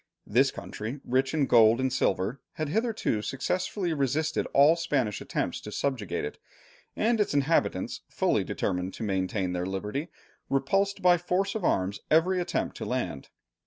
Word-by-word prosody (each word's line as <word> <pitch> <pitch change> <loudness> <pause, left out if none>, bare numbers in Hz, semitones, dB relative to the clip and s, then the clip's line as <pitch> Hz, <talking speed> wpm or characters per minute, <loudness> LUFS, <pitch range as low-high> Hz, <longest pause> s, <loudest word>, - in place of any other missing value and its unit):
This 130 +6 +3
country, 115 +4 -6
rich 130 +2 +1
in 155 -3 +2
gold 115 -1 +6
and 130 -1 0
silver, 105 0 0
had 155 -2 -3
hitherto 220 - 0
successfully 180 - -2
resisted 150 +2 0
all 145 +4 +5
Spanish 135 -10 -1
attempts - - -2
to 105 - -8
subjugate 105 - -2
it, 75 - -7 0.6
and 225 0 +2
its 200 - 0
inhabitants, 145 +4 +1
fully - - +1
determined 90 +1 -2
to - - -6
maintain 95 -2 -1
their 90 0 -2
liberty, 105 - -3 0.4
repulsed 195 +10 +1
by 175 -1 +6
force 185 +3 0
of 220 - -4
arms 95 - +1
every 180 +4 +3
attempt 175 - -2
to - - -5
land. 70 - -3
135 Hz, 155 wpm, -28 LUFS, 105-170 Hz, 0.6 s, gold